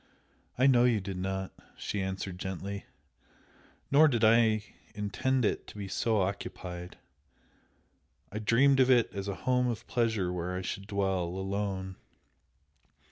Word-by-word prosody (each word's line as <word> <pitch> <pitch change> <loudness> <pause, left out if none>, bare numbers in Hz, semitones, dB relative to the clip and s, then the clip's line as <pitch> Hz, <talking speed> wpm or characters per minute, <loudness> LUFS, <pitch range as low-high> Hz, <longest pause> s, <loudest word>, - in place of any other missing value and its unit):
"I 130 - +4
know 125 -3 +6
you 120 -3 +3
did 95 -1 -5
not;" 95 +1 -3 0.3
=she 100 - -3
answered, 95 -1 -4
gently 95 +2 -5 1.0
"Nor 150 +3 +7
did 120 -5 0
I 110 -1 +5 0.3
intend 110 +5 0
it - - -1
to - - -11
be 100 -1 -5
so 110 +2 +1
occupied. 90 -2 -5 1.3
I 105 - -4
dreamed 130 +6 +4
of 130 0 +5
it 120 -3 +4
as 100 0 -4
a 100 - -2
home 125 -1 +3
of 120 -2 -3
pleasure 110 -7 0
where 90 +1 -3
I 95 - -3
should 100 +2 -5
dwell 95 -3 0
alone! 95 +1 -3
100 Hz, 140 wpm, -30 LUFS, 95-115 Hz, 1.3 s, Nor